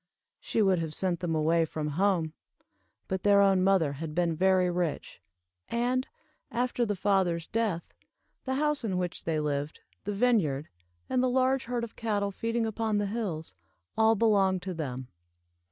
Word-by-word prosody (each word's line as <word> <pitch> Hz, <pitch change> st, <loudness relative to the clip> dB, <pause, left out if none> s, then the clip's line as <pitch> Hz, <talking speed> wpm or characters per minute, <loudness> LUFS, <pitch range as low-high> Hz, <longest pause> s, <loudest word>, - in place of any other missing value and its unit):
She 220 Hz, -, 0 dB
would 190 Hz, -3 st, +3 dB
have 160 Hz, -2 st, -4 dB
sent 180 Hz, -3 st, 0 dB
them 170 Hz, -3 st, -1 dB
away 165 Hz, +2 st, +3 dB
from 155 Hz, -1 st, -3 dB
home, 170 Hz, -1 st, +1 dB, 0.7 s
but 190 Hz, -1 st, -2 dB
their 205 Hz, -1 st, +5 dB
own 195 Hz, -2 st, +4 dB
mother 185 Hz, -7 st, +3 dB
had 155 Hz, +2 st, -6 dB
been 170 Hz, -2 st, +1 dB
very 185 Hz, +1 st, +3 dB
rich, 175 Hz, -3 st, -3 dB, 0.5 s
and, 245 Hz, +2 st, 0 dB, 0.4 s
after 245 Hz, 0 st, 0 dB
the 205 Hz, -, 0 dB
father's 185 Hz, -4 st, +1 dB
death, 215 Hz, -7 st, -2 dB, 0.5 s
the 260 Hz, 0 st, -1 dB
house 300 Hz, -1 st, +1 dB
in 195 Hz, -5 st, -1 dB
which 180 Hz, -2 st, -3 dB
they 160 Hz, -2 st, 0 dB
lived, 145 Hz, 0 st, -2 dB, 0.2 s
the 205 Hz, -, -2 dB
vineyard, 190 Hz, -, +1 dB, 0.4 s
and 255 Hz, -, +1 dB
the 255 Hz, -, +2 dB
large 260 Hz, +1 st, +2 dB
herd 240 Hz, 0 st, -2 dB
of 230 Hz, -, -7 dB
cattle 205 Hz, -3 st, -1 dB
feeding 230 Hz, +3 st, -1 dB
upon 220 Hz, -1 st, -1 dB
the 205 Hz, -, +1 dB
hills, 195 Hz, -, -3 dB, 0.4 s
all 220 Hz, 0 st, +4 dB
belonged 195 Hz, -4 st, +3 dB
to 185 Hz, 0 st, -4 dB
them. 130 Hz, -6 st, -5 dB
190 Hz, 165 wpm, -29 LUFS, 165-225 Hz, 0.7 s, their